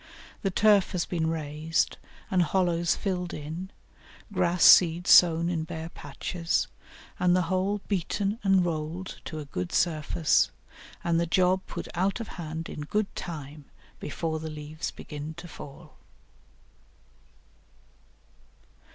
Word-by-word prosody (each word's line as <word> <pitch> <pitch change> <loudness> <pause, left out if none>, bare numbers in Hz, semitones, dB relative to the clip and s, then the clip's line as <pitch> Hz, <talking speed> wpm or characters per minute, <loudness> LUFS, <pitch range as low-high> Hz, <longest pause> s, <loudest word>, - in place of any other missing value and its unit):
The 195 - 0
turf 205 0 +4
has 175 -2 0
been 165 -3 -1
raised 155 +1 -1 0.3
and 185 -2 +4
hollows 175 -1 +2
filled 180 -3 -3
in, 160 +5 -6 0.6
grass 180 -2 +2
seed 175 0 +7
sown 170 -2 +6
in 170 -2 -1
bare 160 0 -6
patches, 165 +4 -2 0.5
and 180 0 +4
the 180 - +3
whole 190 +3 0
beaten 200 +2 -1
and 195 -2 +4
rolled 165 +3 -4
to 155 - -6
a 150 - -5
good 90 -10 -4
surface, 155 -1 +2 0.5
and 170 -1 +2
the 170 - 0
job 185 +2 +3
put - - -6
out 190 +6 0
of 230 - -6
hand 165 -1 -6
in - - -7
good 200 +7 -2
time 150 -3 -7 0.3
before 160 +1 -3
the 160 0 -5
leaves 155 +1 -5
begin 150 +1 -8
to 170 +1 -9
fall. 155 0 -11
170 Hz, 130 wpm, -28 LUFS, 155-185 Hz, 0.6 s, seed